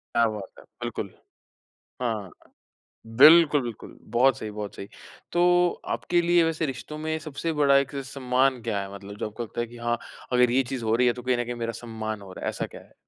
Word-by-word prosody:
क्या 115 -1 +5
बात 105 -2 -5
है! - - -12 0.2
बिल्कुल, - - -4 0.9
हाँ, 110 -6 -2 0.9
बिल्कुल, 150 0 +8
बिल्कुल, 120 -3 -8 0.2
बहुत 135 +3 +5
सही, 110 - -5
बहुत 105 -1 -6
सही। 100 - -8 0.4
तो 175 0 +4 0.2
आपके 175 -1 +1
लिए 170 0 +4
वैसे 165 -1 0
रिश्तों 135 +3 -6
में 155 +1 -2
सबसे 155 +1 -4
बड़ा 140 -1 +6
एक 140 0 0
सम्मान 130 -1 +1
क्या 100 -2 -2
है? 100 0 -7
मतलब 100 +1 -10
जो - - -3
आपको 115 +3 -6
लगता 115 +1 -4
है 120 - -3
कि 120 +1 -13
हाँ, 120 0 -1 0.3
अगर 125 -1 +4
ये 130 +1 +3
चीज़ 125 -3 -3
हो 110 +1 +2
रही 125 +1 +3
है 120 - +3
तो 125 - -8
कहीं 125 -1 +1
न 120 - 0
कहीं 120 0 -4
मेरा 115 - -1
सम्मान 110 -2 -5
हो 95 -1 -11
रहा - - -9
है, - - +1
ऐसा - - -3
क्या - - -12
है? - - -22
125 Hz, 220 wpm, -26 LUFS, 110-145 Hz, 0.9 s, बिल्कुल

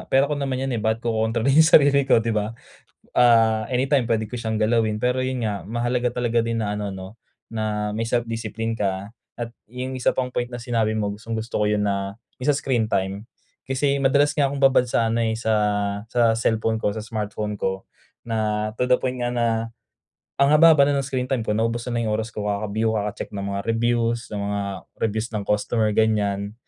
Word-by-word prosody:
"Pera 135 +1 +4
ko 150 - -1
naman 135 -2 -2
yan 135 0 -2
eh 115 - -1
ba't 110 +1 0
ko 115 - +1
kokontrolin 110 +4 +1
yung - - +7
sarili 140 -1 +4
ko," 115 - +5
di 115 - 0
ba? 105 0 -1 0.6
Ah, 115 -2 +4
anytime 130 0 +2
puwede 110 -2 0
ko - - -7
siyang 110 -1 -2
galawin, 110 -1 +1
pero 125 +1 +1
yun 130 -1 -2
nga, 100 -3 -4
mahalaga 120 +2 -1
talaga 120 -1 +1
din 115 0 -2
na 105 0 -2
ano, 100 -1 -3
'no, 95 +4 -9 0.3
na 105 -1 -2
may 115 +1 -2
self-discipline 115 -1 -2
ka 100 0 -2 0.3
at 120 -1 -5 0.2
yung 125 +2 -5
isa 130 - 0
pang 125 -1 -1
point 120 -1 -1
na 120 - -6
sinabi 115 -2 -1
mo, 105 -1 -1
gustong-gusto 115 +1 -4
ko - - +3
yun 105 -1 +1
na, 100 0 -2 0.2
yun 130 - -2
sa 145 - +4
screen 120 -6 0
time. 100 +2 -2 0.4
Kasi 140 +1 +1
madalas 140 +2 +3
nga 145 -1 +2
akong 140 0 -5
babad 135 -2 +5
sa 115 -1 +1
ano 115 +1 0
eh, 110 -1 +1
sa 110 -1 -1 0.6
sa 115 -1 +3
cellphone 110 -1 0
ko, - - +1
sa 110 - -4
smartphone 105 -1 -4
ko, 95 0 -2 0.4
na 110 -2 -1
to 125 - +1
the 125 - +5
point 130 -1 -3
nga 120 - 0
na 120 -1 +1 0.9
ang 140 - +5
haba-haba 155 -2 +7
na 145 - +1
ng - - -6
screen 130 -1 -2
time 130 -3 -1
ko - - -2
naubos 115 +2 0
ko 125 - -5
na 120 - 0
yung 110 -2 0
oras 110 +1 -3
ko 105 -1 -4
kaka-view, 105 +2 -1
kaka-check 105 -1 -3
ng 100 - -3
mga 100 0 -2
reviews, 120 +1 0
ng 105 - -3
mga 100 0 -2 0.4
reviews 110 +1 -1
ng 105 - -1
customer, 105 +2 +1
ganiyan. 105 -2 +1
115 Hz, 210 wpm, -23 LUFS, 105-125 Hz, 0.9 s, yung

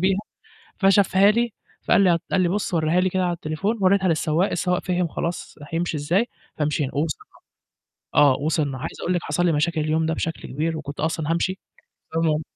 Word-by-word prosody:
بيها 190 +1 +2 0.6
فشافها 195 0 +5
لي 235 +2 +1 0.3
فقال - - +4
لي 190 -2 +5
ه 170 - +3
قال 190 - +3
لي 180 - +3
بُصّ 195 0 -1
وريها 160 +2 +2
لي 185 - +2
كده 185 0 0
على 175 - 0
التليفون، 170 +7 -2
وريتها 190 0 +3
للسواق، 160 +2 +1
السواق 180 -1 0
فِهِم 180 -1 0
خلاص، 170 +2 -4
راح 145 +2 -9
يمشي 170 -1 -1
إزاي، 170 +10 +1 0.3
فمشينا 150 -2 -1
ووصلْنا 150 +1 -2 0.9
آه، 145 -2 +6
وصلْنا، 145 -2 -1
عايز 145 +5 -6
أقول 180 - 0
لِك 175 - -1
حصل 165 +5 0
لي 175 - +3
مشاكل 155 +2 +1
اليوم 155 +1 +1
ده 160 - 0
بشكل 165 0 -4
كبير 160 +4 -2
وكنت 145 -2 -7
أصلًا 160 0 -1
هامشي 185 +3 0 0.5
بسبب 165 +1 +1
ال 155 - -3
165 Hz, 195 wpm, -23 LUFS, 155-185 Hz, 0.9 s, آه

